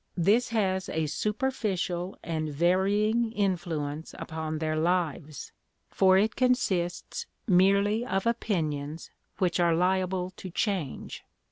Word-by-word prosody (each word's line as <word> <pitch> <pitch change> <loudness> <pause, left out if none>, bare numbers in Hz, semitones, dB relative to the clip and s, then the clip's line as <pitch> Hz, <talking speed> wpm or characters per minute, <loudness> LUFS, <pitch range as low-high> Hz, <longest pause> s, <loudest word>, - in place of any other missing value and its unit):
This 205 +8 +3
has 190 -4 0
a 160 0 -1
superficial 190 - -2
and 155 -2 -2
varying 200 +8 +2
influence 165 -7 -2
upon 160 -1 -4
their 155 0 -1
lives, 155 -3 -1 0.4
for 190 0 +5
it 210 +2 +2
consists 250 - 0 0.2
merely 200 +3 +4
of 195 -4 -1
opinions 160 -10 -2 0.3
which 180 -2 +1
are 170 -1 +4
liable 185 +1 +1
to 190 - -7
change. 180 - -3
185 Hz, 110 wpm, -28 LUFS, 160-205 Hz, 0.4 s, for